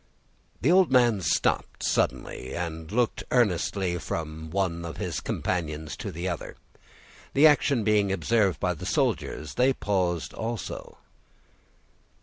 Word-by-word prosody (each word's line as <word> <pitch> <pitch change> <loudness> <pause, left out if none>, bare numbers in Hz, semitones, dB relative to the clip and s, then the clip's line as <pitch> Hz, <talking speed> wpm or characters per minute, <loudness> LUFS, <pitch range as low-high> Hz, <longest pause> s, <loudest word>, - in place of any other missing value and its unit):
The 140 - +3
old 185 -4 +5
man 120 -5 +4
stopped 85 - 0
suddenly, 65 - -1
and 80 -1 -5
looked 120 +1 0
earnestly 95 -5 +1
from 80 -1 -5
one 85 -2 -1
of 85 -1 -6
his - - -3
companions 80 -4 -3
to - - -5
the 85 +3 -4
other; 85 -3 -4 0.8
the 140 +3 +6
action 145 -5 +4
being 105 -2 +3
observed 100 +1 +1
by - - +1
the - - -7
soldiers, 75 -1 -1
they 130 +2 +3
paused 90 -8 -1
also. 115 0 -5
95 Hz, 130 wpm, -27 LUFS, 85-115 Hz, 0.8 s, the